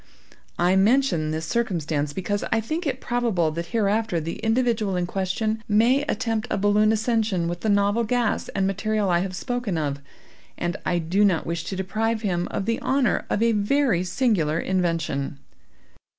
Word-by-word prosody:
I 175 +2 +3
mention 195 - +3
this 160 +1 -3
circumstance, 165 -11 -1
because 190 +6 -2
I 225 - +3
think 310 +9 -3
it 265 -2 -2
probable 225 -10 0
that 170 +2 -4
hereafter 215 -1 0
the 165 +1 -4
individual 225 -3 +1
in 180 -1 0
question 205 +4 -2
may 230 +6 +4
attempt 225 +1 -1
a - - 0
balloon 205 +2 +3
ascension 220 -5 0
with 175 0 -3
the 220 - -1
novel 205 +3 +2
gas 235 -1 0
and 195 - +1
material 200 0 0
I 175 - +3
have 185 0 -3
spoken 245 -4 -2
of, 145 -2 -2 0.6
and 175 0 -2
I 175 - +1
do 175 +5 +1
not 185 -5 +2
wish 170 0 -3
to 195 - -4
deprive 220 +4 -1
him 175 -3 0
of 195 - -3
the 230 0 0
honor 270 -2 +1
of 215 - +1
a 230 - +4
very 215 -2 +2
singular 180 - +1
invention. 165 -7 -1
200 Hz, 170 wpm, -24 LUFS, 175-225 Hz, 0.6 s, may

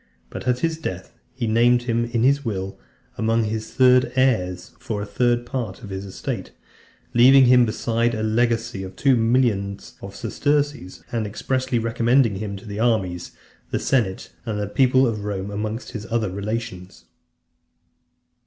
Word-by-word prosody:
But - - -7
at 125 0 +1
his 165 -1 -1
death, 95 - -6 0.2
he 125 -2 -2
named 120 +2 +3
him 120 -1 0
in 120 -1 -1
his 140 +2 +3
will, 95 -5 -4 0.4
amongst 110 0 +1
his 110 0 -4
third 125 -1 +4
heirs, 90 -9 +1
for 105 -2 -4
a - - -4
third 120 +4 +1
part 120 -6 -5
of 100 - -8
his 95 +1 -5
estate; 95 - -5 0.6
leaving 130 +3 +7
him 125 -1 +6
besides 115 +1 0
a 110 - -3
legacy 115 -2 0
of 95 0 -8
two 135 -2 +3
millions 115 -4 0
of 100 0 -9
sesterces, 145 -3 -1
and 115 -3 -1
expressly 130 +4 -1
recommending 115 0 +2
him 100 -1 -4
to 95 - -13
the 105 -1 -6
armies, 95 -7 0 0.4
the - - -1
senate 110 -8 0
and 105 -3 -3
people 130 +3 +4
of 110 -4 -2
Rome, 100 -1 -4
amongst 105 +3 -4
his 110 -2 -7
other 115 -4 -1
relations. 100 - -5
115 Hz, 155 wpm, -22 LUFS, 100-125 Hz, 0.6 s, leaving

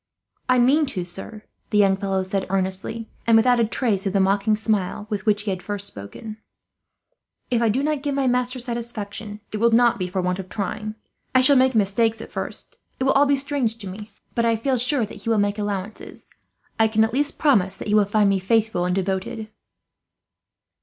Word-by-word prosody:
"I 255 - +5
mean 280 +5 +4
to, 185 -8 -3
sir," 195 +4 -5 0.3
the 210 - +1
young 195 -2 +5
fellow 195 -1 -1
said 190 +1 -2
earnestly, 195 +4 -2 0.2
and 230 -1 +6
without 245 +2 +4
a - - +4
trace 215 -4 0
of 195 - -2
the 200 - +2
mocking 200 +2 +2
smile 210 -2 -1
with 205 -1 -3
which 210 -1 +2
he 205 - -2
had 185 -1 -4
first 200 +1 -5
spoken. 200 - -8 1.1
"If 240 -1 +2
I 230 - +3
do 255 +6 0
not 300 -1 0
give 285 -1 -2
my 275 -1 +1
master 250 0 +1
satisfaction, 230 -4 -6
it - - -1
will 235 +2 +4
not 235 0 +4
be 180 - -1
for 180 +1 -3
want 180 +1 -1
of 185 -1 -7
trying. 215 +1 -4 0.4
I 255 - +7
shall 280 +2 +5
make 260 -1 +4
mistakes 220 +2 +2
at 225 - -9
first - - -5 0.2
it - - 0
will 270 - +3
all 285 +1 +4
be 280 0 +3
strange 270 -5 -1
to 210 -4 -9
me, 205 +3 -8 0.2
but 235 - 0
I 230 -1 +3
feel 255 +3 0
sure 250 0 +3
that 205 0 -11
he 230 - -4
will 225 - +3
make 205 +1 0
allowances. 205 0 -5 0.5
I 225 - +5
can 220 0 +2
at 220 +1 -1
least 285 +2 0
promise 205 -11 +2
that - - -7
he - - +1
will 210 -1 +5
find 205 +1 +2
me 195 -1 +2
faithful 215 -2 +1
and 180 0 0
devoted." 195 +4 -3
215 Hz, 215 wpm, -23 LUFS, 195-240 Hz, 1.1 s, I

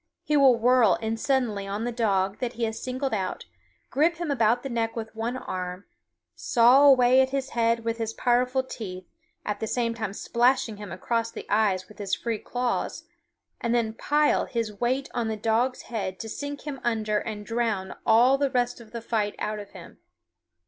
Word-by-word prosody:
He 300 - 0
will 270 -4 +6
whirl 235 -5 +4
in 220 +6 -2
suddenly 225 -5 0
on 205 +3 -3
the 240 - -1
dog 200 -4 0
that 245 -1 -2
he 235 0 -4
has 220 -1 -2
singled 260 0 -3
out, 190 -3 -3 0.5
grip 315 +5 +3
him 340 -3 -3
about 235 -2 +2
the - - -3
neck 225 -2 -1
with 220 -1 -6
one 230 +3 -2
arm, 180 -4 -5 0.5
saw 250 +4 +5
away 255 -1 +6
at 260 - +1
his 275 0 -2
head 230 0 +1
with 230 0 -3
his 225 -1 -2
powerful 250 +1 +2
teeth, 185 -7 -7 0.4
at 210 -1 -2
the 220 - -3
same 230 0 0
time 220 -4 -4
slashing 240 0 +1
him 205 -3 -8
across 230 +5 -1
the - - -8
eyes 200 -3 +2
with 210 - -16
his 200 -2 -1
free 230 -3 -3
claws, 245 -1 -2 0.6
and 235 -1 0
then 225 -2 0
pile 295 +6 +2
his 230 -3 -3
weight 260 +3 0
on 235 -2 -1
the 220 -1 -2
dog's 230 +4 0
head 195 -5 -4
to 225 - -6
sink 285 +5 -5
him 285 -4 -6
under 215 -3 0
and 210 -2 -6
drown 225 -5 -2
all 245 +4 +5
the 280 -1 +2
rest 245 -2 -1
of 225 -1 -16
the 235 -1 -6
fight 215 -3 -1
out 210 0 -3
of 205 -1 -9
him. - - -13
230 Hz, 195 wpm, -26 LUFS, 215-250 Hz, 0.6 s, will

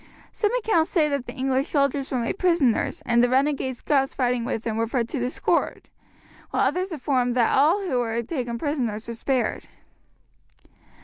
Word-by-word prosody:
Some 420 - 0
accounts 420 -9 +1
say 315 -4 +2
that 280 -3 -2
the - - -6
English 265 +1 0
soldiers 280 -1 0
were 260 - 0
made 235 -1 -2
prisoners, 335 -10 +1
and 235 0 +3
the 245 - +3
renegade 265 -1 +1
Scots 270 -1 0
fighting 250 -2 0
with 225 - -3
them 225 -2 -2
were 225 +1 0
put 235 -1 -1
to 280 - -3
the 245 +1 -1
sword; - - -1 0.6
while - - +1
others 370 +2 -1
affirm 255 -5 0
that 240 -2 +2
all 335 +9 +3
who 255 -8 0
were 235 -1 -1
taken 240 -3 -3
prisoners 235 -7 -2
were 235 - -4
spared. 245 0 -1
260 Hz, 180 wpm, -24 LUFS, 240-295 Hz, 0.6 s, and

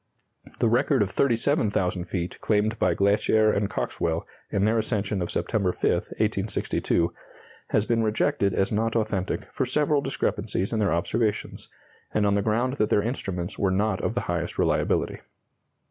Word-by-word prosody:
The - - +2
record 120 +1 +3
of 100 - -4
37,000 110 - +1
feet 90 -1 -4
claimed 110 +1 +1
by 90 -2 +2
Glaisher 105 +2 +3
and 100 0 0
Coxwell 85 -3 -2 0.2
in 100 0 +1
their 110 +1 +2
ascension 105 -3 -1
on 85 - -1
September 100 -2 0
5, - - -16
1862, 85 0 -1 0.5
has 105 - +1
been 115 0 +1
rejected 110 0 +1
as 95 - +1
not 115 +2 0
authentic 105 -4 -1
for 130 - -1
several 145 +2 +2
discrepancies 105 -6 -2
in 110 - 0
their 100 -3 +2
observations, 105 +5 -1 0.5
and 105 -1 +3
on 100 - +3
the 100 - +2
ground 120 +6 0
that 105 - +1
their 105 - +3
instruments 95 -6 -3
were 100 - +2
not 95 +1 0
of 115 - -2
the 120 - 0
highest 85 0 -3
reliability. - - +1
105 Hz, 160 wpm, -26 LUFS, 95-115 Hz, 0.5 s, record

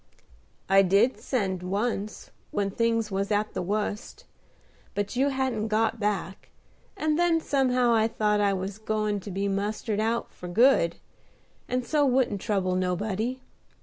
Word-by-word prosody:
"I 195 +1 +6
did 200 +7 +3
send 190 -8 -1
once, 205 +3 -3 0.2
when 200 -1 -1
things 230 0 0
was 195 +1 -1
at 210 0 0
the - - -2
wust; 210 +3 -3 0.7
but 205 +3 -2
you 270 +3 +2
hadn't 260 -5 -1
got 220 +1 +1
back, 200 -3 -3 0.5
and 310 -3 0
then 345 -2 +3
somehow 255 -5 +2
I 220 -1 +3
thought 210 -2 +1
I 200 -1 +3
was 190 +2 -4
goin' 215 -1 -1
to 195 - -9
be 195 +1 -2
mustered 205 +2 -2
out 230 +2 -1
for 180 - -9
good, 175 -3 +4 0.7
and 250 0 -1
so 300 +1 +2
wouldn't 250 -7 +2
trouble 190 -3 0
nobody. 205 +7 -1
215 Hz, 150 wpm, -27 LUFS, 195-240 Hz, 0.7 s, I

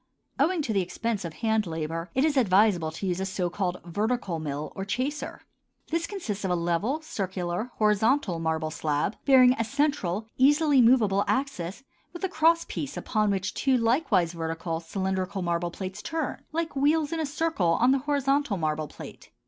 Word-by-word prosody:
Owing 320 +3 +2
to 230 - -2
the 195 - +2
expense 210 +3 -3
of 170 - -4
hand 220 -1 0
labor, 165 +1 -4
it 265 +3 +3
is 310 -2 +1
advisable 200 - +3
to 160 +5 -6
use 180 -1 -1
a 190 - -1
so 185 -2 -2
called 180 -1 -2
vertical 205 -1 -1
mill 150 -1 -4
or 195 - -4
chaser. 255 +9 -3 0.5
This 335 +1 0
consists 230 - -4
of 190 - -1
a 180 - +2
level, 175 - -1
circular, 190 - -3
horizontal 215 -2 +2
marble 160 -1 -1
slab, 155 +4 -1
bearing 255 -2 +7
a - - +3
central, 230 - 0
easily 290 0 +5
movable 220 -5 +4
axis 260 -6 -2 0.3
with 345 - -9
a 380 - +1
crosspiece 325 -4 +1
upon 215 -2 0
which 190 -1 -1
two, 265 -2 +2
likewise 230 - +2
vertical, 165 0 -3
cylindrical 190 +2 -2
marble 170 0 -1
plates 190 +3 -6
turn 320 +4 -3
like 325 -1 -2
wheels 295 +2 +2
in 330 - -2
a 315 - 0
circle 280 - +1
on 245 +2 +5
the 270 - +3
horizontal 280 -4 +1
marble 155 -2 -1
plate. - - -11
210 Hz, 175 wpm, -27 LUFS, 175-275 Hz, 0.5 s, bearing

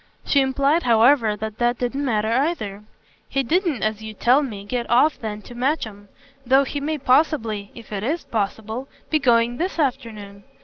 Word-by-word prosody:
She 280 - +3
implied 275 +4 +2
however 230 -2 +4
that 215 0 -6
that 240 0 +1
didn't 260 +3 -2
matter 220 -4 0
either. 235 - -1 0.5
"He 275 - 0
didn't, 335 - 0
as 215 0 -1
you 220 0 -8
tell 250 +7 +4
me, 210 -8 -6
get 240 +2 -3
off 260 +6 +3
then 210 -2 -5
to - - -11
Matcham; 235 -6 -2 0.4
though 265 +2 +4
he 285 +2 -4
may 310 +2 -2
possibly, 250 -7 +1
if 230 -2 -12
it 195 - -3
IS 300 +10 -2
possible, 220 +4 -3 0.2
be 310 - +3
going 240 -3 +2
this 360 +5 -2
afternoon. 225 -9 -3
240 Hz, 175 wpm, -22 LUFS, 215-275 Hz, 0.5 s, however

